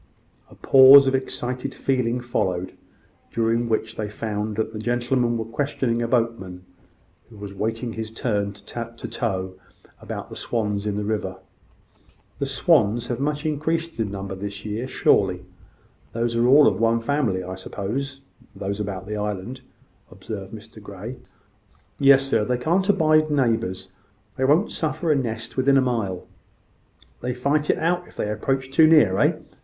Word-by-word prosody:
A - - -16
pause 135 +1 +8
of 135 - +1
excited 130 0 -3
feeling 125 -2 0
followed, 95 -6 -2 0.6
during 115 +1 0
which 110 0 -1
they 105 -1 -3
found 105 0 -4
that 110 +1 -2
the 110 - -5
gentlemen 120 +1 0
were 110 - -3
questioning 120 -1 -1
a 115 - -1
boatman, 115 -7 -1 0.7
who 110 - -14
was 100 -1 -8
awaiting 115 +4 -3
his 110 -1 -5
turn 105 -3 -1
to 115 +3 -7
tow, 95 -1 -3 0.5
about - - -7
the - - -7
swans 105 -3 -2
in 105 - -1
the 105 - -2
river. 105 -3 -2 1.0
"The 140 - -1
swans 120 - +2
have 120 -1 -2
much 150 +2 -2
increased 160 0 -2
in 110 -3 0
number 95 0 -5
this 100 +1 -5
season, 105 +4 -4
surely. 95 -7 +2 0.7
Those 115 0 -1
are 120 +1 +3
all 140 +3 +7
of - - +2
one 115 0 +3
family, 115 -7 0
I 90 +1 -6
suppose 120 +9 -5 0.3
those 100 +1 -4
about 95 -3 -4
the 105 +1 -4
island," 105 +5 -4 0.5
observed 100 -3 -8
Mr 110 0 -11
Grey. 105 +5 -8 0.8
"Yes, 135 -1 +6
sir; 135 -5 +1
they 125 +3 0
can't 175 +10 0
abide 155 -4 +4
neighbours. 115 -9 0 0.4
They 130 - 0
won't 155 +9 +3
suffer 155 +1 -1
a - - +4
nest 115 -4 -3
within 135 +1 +4
a - - +6
mile." 110 -8 -2 1.0
"They 125 0 -3
fight 145 +4 0
it - - +3
out, 175 +2 0
if - - -18
they 105 - -2
approach 130 +5 -2
too 155 +3 +6
near, 150 -13 +5
eh?" - - +3
115 Hz, 160 wpm, -23 LUFS, 105-135 Hz, 1.0 s, pause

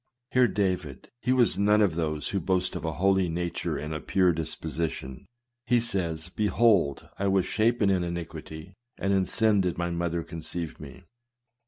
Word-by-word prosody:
Hear 125 -1 +5
David: 90 - -2
he 125 - 0
was 125 -5 +3
none 105 +1 +4
of 100 -6 +3
those 75 -2 -2
who 100 - -1
boast 90 +1 0
of - - -5
a 80 -1 -2
holy 95 +1 +2
nature 85 +1 -2
and 75 +1 -4
a 80 - -3
pure 90 +5 +2
disposition. 80 -4 -4 0.4
He 120 0 +4
says, 90 -8 -1
" - - -28
Behold, 105 -8 +2
I 100 - +1
was 95 -2 +2
shapen 110 -1 +2
in 90 -2 +1
iniquity; 85 0 -6 0.2
and 100 0 0
in 95 -1 +2
sin 110 -2 +3
did 90 -3 -1
my 85 0 -1
mother 85 0 -1
conceive 80 0 -6
me." 75 +6 -11
90 Hz, 175 wpm, -27 LUFS, 80-100 Hz, 0.4 s, Hear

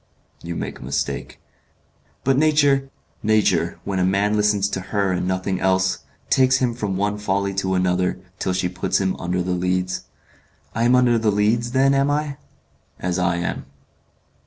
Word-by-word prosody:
"You 85 0 -5
make - - -5
a - - -10
mistake." 70 +3 -3 0.8
"But 135 +1 +3
nature 145 -2 +3 0.2
" - - -40
"Nature, 105 - +1
when 95 -2 -2
a - - +2
man 100 +3 +2
listens 105 -1 +2
to 95 - -3
her 100 -3 +1
and 90 0 -1
nothing 95 0 -1
else, 95 0 +1 0.3
takes 130 0 +4
him 125 -2 0
from 105 -5 -3
one 105 +1 -1
folly 100 -1 -1
to 95 -1 0
another, 90 0 +1 0.2
till 95 - -1
she 90 0 0
puts 90 +1 -1
him 95 -1 0
under 90 0 -1
the 90 - -2
Leads." 90 +1 -1 0.7
"I 115 +1 0
am 125 +1 +5
under 120 -2 +4
the 110 -1 +1
Leads, 110 +4 +1
then, 135 +1 +4
am 140 +1 +2
I?" 145 -1 -1 0.6
"As 90 0 -1
I 90 -1 +1
am." 85 -5 -3
100 Hz, 175 wpm, -22 LUFS, 90-120 Hz, 0.8 s, am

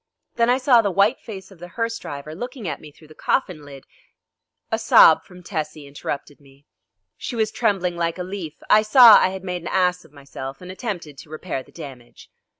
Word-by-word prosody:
Then 235 0 +1
I 250 - +4
saw 255 -3 +4
the 205 - -1
white 200 +6 +2
face 195 -3 -10
of 190 - -16
the 175 - -9
hearse 230 0 -2
driver 145 +2 -8
looking 245 - -7
at - - -4
me 150 - -12
through 155 +1 -20
the - - -13
coffin 180 - -1
lid 140 -2 -12 0.5
" - - -55
A - - 0
sob 160 - +6
from 180 -1 -15
Tessie 155 -4 -5
interrupted 140 +1 -7
me. 140 0 -22 0.5
She 245 - -6
was 220 -1 0
trembling 190 -6 0
like 170 0 -1
a 180 - -4
leaf. 180 -4 -7
I 215 - +6
saw 225 +1 +8
I - - +3
had 190 0 -7
made 180 -2 -4
an - - -8
ass 180 -1 +1
of - - -20
myself 135 -1 -9
and 180 0 -9
attempted 175 - -6
to - - -13
repair 155 -2 -5
the - - -19
damage. 135 -7 -12
180 Hz, 215 wpm, -22 LUFS, 150-210 Hz, 0.5 s, saw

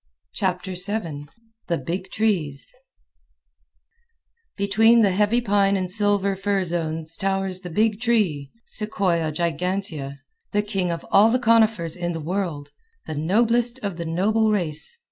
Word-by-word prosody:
Chapter 185 -2 -2
7 180 -6 -2 0.4
The 170 - 0
Big 180 +8 -4
Trees 180 - -1 1.8
Between 225 +4 +4
the 200 -3 +4
heavy 210 +5 +2
pine 200 -3 +2
and 185 -1 -3
silver 205 -1 +1
fir 195 0 0
zones 165 -2 -2
towers 195 -1 -1
the 180 -1 -8
Big 215 +4 +1
Tree 195 - +1 0.2
(Sequoia 185 -7 -1
gigantea), 165 -3 -2 0.4
the 205 0 +2
king 195 -4 -2
of 170 -1 -4
all 210 +3 +6
the 245 - +3
conifers 220 -8 +3
in 175 -1 -3
the 165 - -4
world, 165 -3 -3 0.3
"the - - -5
noblest 230 - +1
of 200 -4 -3
the 170 - -4
noble 215 +7 +1
race." 175 - -2
190 Hz, 135 wpm, -23 LUFS, 170-210 Hz, 1.8 s, all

